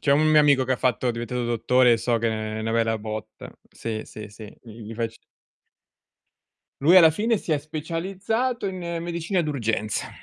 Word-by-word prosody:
C'è 140 - 0
un 150 +2 +3
mio 155 -1 +6
amico 140 -3 +4
che 130 - 0
ha - - 0
fatto 125 0 0
è - - +3
diventato 120 +1 -3
dottore 120 +1 +3
e - - +4
so 115 +1 0
che 115 0 0
è 110 0 -3
'na 115 +1 -2
bella 115 -1 +1
botta. 110 0 -7 0.2
Sì, 110 -1 -5
sì, 105 -1 -10
sì, 105 0 -11
gl 115 - -13
gli 115 0 -9
facci 115 0 -4 1.6
Lui 165 +7 +6
alla 165 -3 +8
fine 220 +8 0
si 160 - -3
è 150 - +2
specializzato 190 - -3
in 190 -1 -4 0.2
medicina 170 +2 -2
d'urgenza. 115 - -2
125 Hz, 190 wpm, -24 LUFS, 115-160 Hz, 1.6 s, alla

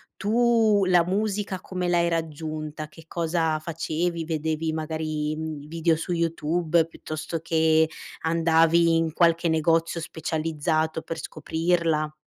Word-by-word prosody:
tu 220 -2 +3
la 180 -2 +4
musica 200 +1 -1
come 180 -1 -4
l'hai 170 -1 +3
raggiunta? 155 -2 -4
Che 160 +1 -16
cosa 165 -2 0
facevi? 165 +1 -2
Vedevi 160 0 -2
magari, 155 -1 -2
mhmm, 155 -2 -5
i - - -12
video 165 0 +1
su 170 +3 -3
YouTube 165 0 +1
piuttosto 160 0 -5
che 160 -1 +3 0.3
andavi 165 0 +3
in 165 -1 +1
qualche 170 0 +3
negozio 165 +1 +1
specializzato 160 0 -1
per 165 0 -6
scoprirla? 160 -2 -1
165 Hz, 120 wpm, -25 LUFS, 155-170 Hz, 0.3 s, la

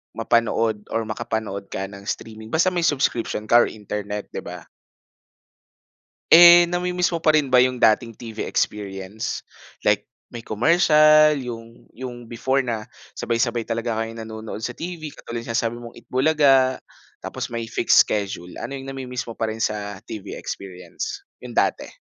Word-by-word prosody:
mapanood 115 -2 +1
or 115 - -1
makapanood 110 -2 -4
ka 95 - -4
ng 100 0 -10
streaming 110 0 -6
basta 165 +8 +2
may 175 - 0
subscription 130 -8 0
ka 120 +2 +5
or - - +4
internet, 105 -1 -6
'di - - -4
ba? - - -9 1.6
Eh, 175 +1 +10
nami-miss 180 0 0
mo 170 - -1
pa 155 -1 +3
rin 150 -3 +2
ba 125 - +6
yung 125 0 +2
dating 115 +1 +3
TV 115 -1 -6
experience, 100 +1 -3 0.4
like - - +2 0.2
may 115 -2 -9
commercial 155 - +5
yung 115 -4 -8
yung 120 -2 -9
before 130 +3 0
na 115 -4 -4 0.3
sabay-sabay 120 0 -1
talaga 115 -1 -2
kayo 115 0 -3
nanonood 110 -1 -7
sa 125 - -2
TV, 160 +3 -6
katulad 115 -4 -7
yung 115 - -8
sinasabi 115 0 0
mong 115 -1 -11
Eat - - -18
Bulaga, 135 -2 +3 0.4
tapos - - -6
may 115 -1 -4
fixed - - +4
schedule. 95 -4 -3
Ano 135 +4 -5
yung 135 - -9
nami-miss 130 -2 -5
mo 115 - -7
pa 110 -1 -2
rin 110 - -6
sa 105 -3 -2
TV 105 -3 -7
experience, 100 - -7 0.2
yung - - -8
dati? - - 0
115 Hz, 160 wpm, -22 LUFS, 110-135 Hz, 1.6 s, Eh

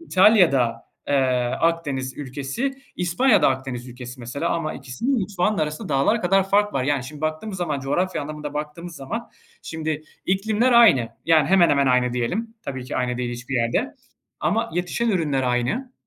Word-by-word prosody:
İtalya 195 - +5
da, 115 -3 0 0.3
eee, 145 - +2 0.5
Akdeniz 145 -6 -1
ülkesi, 145 - -3 0.2
İspanya 180 +9 +3
da - - +6
Akdeniz 130 -2 -3
ülkesi 125 +1 -9
mesela 140 +8 -3
ama 165 -2 -2
ikisinin 180 - -2
mutfağının 195 0 0
arasında 155 0 -2
dağlar 150 +11 +2
kadar 195 +1 +2
fark 205 +1 +3
var. 130 -1 0
Yani, 145 -2 0
şimdi 145 +2 -9
baktığımız 155 +6 -3
zaman, 155 -6 -2
coğrafya 160 +6 -1
anlamında 150 0 -6
baktığımız 155 +3 -6
zaman, 230 - -5 0.3
şimdi, 160 -1 -4 0.2
iklimler 220 +6 +2
aynı, 175 - +6 0.2
yani 160 -3 +4
hemen 185 -3 +5
hemen 140 -1 +3
aynı 125 -1 +3
diyelim, 195 - -2
tabii 130 -2 -5
ki - - -5
aynı 125 -1 -1
değil 125 -1 -2
hiçbir 120 +2 -6
yerde. 115 -1 0 0.5
Ama 220 +9 0
yetişen 180 +7 -1
ürünler 150 -8 0
aynı. 125 - -1
155 Hz, 165 wpm, -23 LUFS, 130-190 Hz, 0.5 s, da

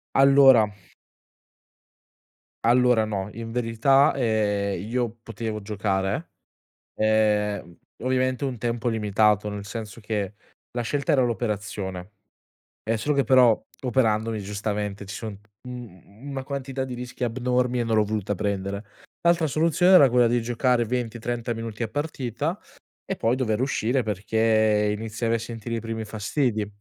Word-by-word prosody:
Allora 135 -4 +7 2.0
allora, 120 -1 +4
no. 100 -2 -3
In 115 0 -7
verità, 125 +4 +3
ehm, 105 -6 0
io 120 -1 -1
potevo 115 -2 -5
giocare, 100 - -2 0.7
ehm, 105 -4 +1 0.3
ovviamente 130 +2 0
un 130 -3 -3
tempo 120 +1 -2
limitato, 105 -1 +2
nel 105 -1 -5
senso 110 +2 -7
che 105 -2 -3 0.4
la 120 - -2
scelta 140 +4 -1
era 135 - +4
l'operazione 105 -5 -3 0.7
è 115 +1 0
solo 145 +6 0
che 140 - +3
però 125 -4 +5 0.3
operandomi, 115 -4 +1
giustamente, 105 0 -3
ci 100 - -7
son 110 -3 -6 0.3
un 125 - -6
mhmm, 105 +6 -14
una 135 -1 -4
quantità 135 -1 -4
di 130 -1 -5
rischi 125 0 -6
abnormi 125 +1 0
e 120 - 0
non 115 -1 +1
l'ho 110 - +4
voluta 105 -1 -2
prendere. 100 +1 -2 0.4
L'altra 170 -1 +3
soluzione 165 +5 +3
era 140 -8 +8
quella 120 -1 +4
di 120 +1 +1
giocare 120 +1 +1
20-30 120 0 -3
minuti 115 0 -6
a 115 - 0
partita 145 - -3 0.5
e - - -3
poi 115 +3 +1
dover 115 -4 0
uscire, 130 -1 +1
perché 110 0 +2
iniziavi 115 +1 -2
a - - +1
sentire 115 0 -6
i 115 - -2
primi 115 0 -5
fastidi. 110 +1 -1
115 Hz, 140 wpm, -25 LUFS, 105-125 Hz, 2.0 s, era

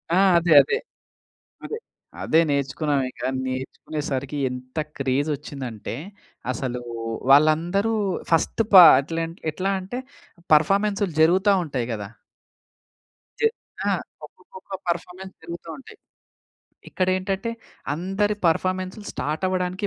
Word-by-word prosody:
ఆ! - - +3 0.2
అదే, 170 0 -1
అదే. 135 - -1 0.9
అదే. 445 - -4 0.4
అదే 160 - +4
నేర్చుకున్నావిక. 140 -1 -1 0.3
నేర్చుకునేసరికి 135 +2 -4
ఎంత 130 +1 -9 0.2
క్రేజొచ్చిందంటే, 135 -4 -3 0.6
అసలూ 125 0 -4 0.5
వాళ్ళందరూ 165 +9 +4 0.4
ఫస్ట్ 165 +7 +2
పాట్లెంట్ 165 +1 +6
ఎట్లా 190 +5 -1
అంటే, 220 +7 -5 0.5
పర్ఫామెన్సులు 200 +3 +2
జరుగుతా 190 +5 +4
ఉంటాయి 130 -6 -3
గదా! 105 -2 -5 1.3
జ - - -8 0.5
ఆ! - - +3 0.3
ఒక్కొక్కొక్క 470 - -16 0.2
పర్ఫామెన్స్‌ 180 +2 -4
జరుగు‌తా 170 0 -8
ఉంటాయి. 270 - -14 0.9
ఇక్కడేంటంటే, 190 +3 -1 0.4
అందరి 195 +5 -1
పర్ఫామెన్సులు 185 +4 -1
స్టార్టవ్వడానికి 185 +5 -2
165 Hz, 90 wpm, -24 LUFS, 140-190 Hz, 1.3 s, పాట్లెంట్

